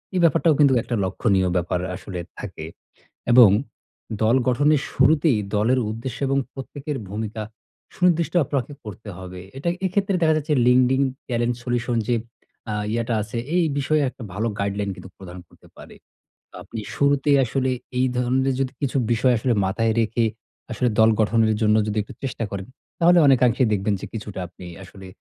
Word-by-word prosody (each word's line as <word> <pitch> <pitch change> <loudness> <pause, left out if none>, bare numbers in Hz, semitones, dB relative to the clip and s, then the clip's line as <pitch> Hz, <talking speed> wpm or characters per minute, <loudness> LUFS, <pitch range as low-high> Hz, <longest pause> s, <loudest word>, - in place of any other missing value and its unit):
এই - - +2
ব্যাপারটাও 165 0 +4
কিন্তু 140 -3 +5
একটা 120 +1 -3
লক্ষনীয় 95 0 +1
ব্যাপার 90 0 0 0.2
আসলে 95 -1 -7 0.2
থাকে। 90 -6 -7 0.7
এবং 120 -4 +9 0.7
দল 110 +3 +4
গঠনের 145 +3 +3
শুরুতেই 140 -1 +3 0.2
দলের 120 +5 +2
উদ্দেশ্য 115 +3 -5
এবং 135 +1 +1 0.2
প্রত্যেকের 140 +2 -6
ভূমিকা 110 +2 -4 0.5
সুনির্দিষ্ট 175 -2 +1
আপনাকে 135 -1 -3
করতে 105 +1 -9
হবে। 90 -1 -9 0.2
এটায় 170 +5 -1
এক্ষেত্রে 195 +1 0
দেখা 160 -1 +4
যাচ্ছে 150 0 -1
LinkedIn 130 +2 +4 0.3
টেলেন্ট 120 0 0
সলিউশন 120 -1 -1
যে 120 - +2 0.6
আ - - -2 0.2
ইয়েটা 115 0 -1
আছে, 110 +3 -6 0.2
এই 180 - +4
বিষয়ে 150 +2 +1
একটা 125 - -11
ভালো 110 +4 -1
গাইডলাইন 100 0 -1
কিন্তু 95 - -11
প্রদান 90 -1 -10
করতে - - -21
পারে। - - -13 0.7
আপনি 115 - -7
শুরুতেই 140 0 +3
আসলে 130 +2 -1 0.3
এই 130 - +3
ধরনের 130 +2 +1
যদি 130 -1 -1
কিছু 140 -1 -1 0.2
বিষয় 125 +2 +3
আসলে 125 +3 0
মাথায় 110 +4 0
রেখে 115 +1 0 0.5
আসলে 125 - 0
দল 110 0 +6
গঠনের 110 0 +2
জন্য 105 0 +4
যদি 105 0 -2
একটু 105 - -12
চেষ্টা 130 -3 -3
করেন, 100 0 -5 0.3
তাহলে 175 +1 +5
অনেকাংশেই 125 -2 +4
দেখবেন 100 +1 0
যে - - -6
কিছুটা 105 -3 -7
আপনি 90 0 -13 0.2
আসলে 95 +1 -13
120 Hz, 160 wpm, -23 LUFS, 105-135 Hz, 0.7 s, এবং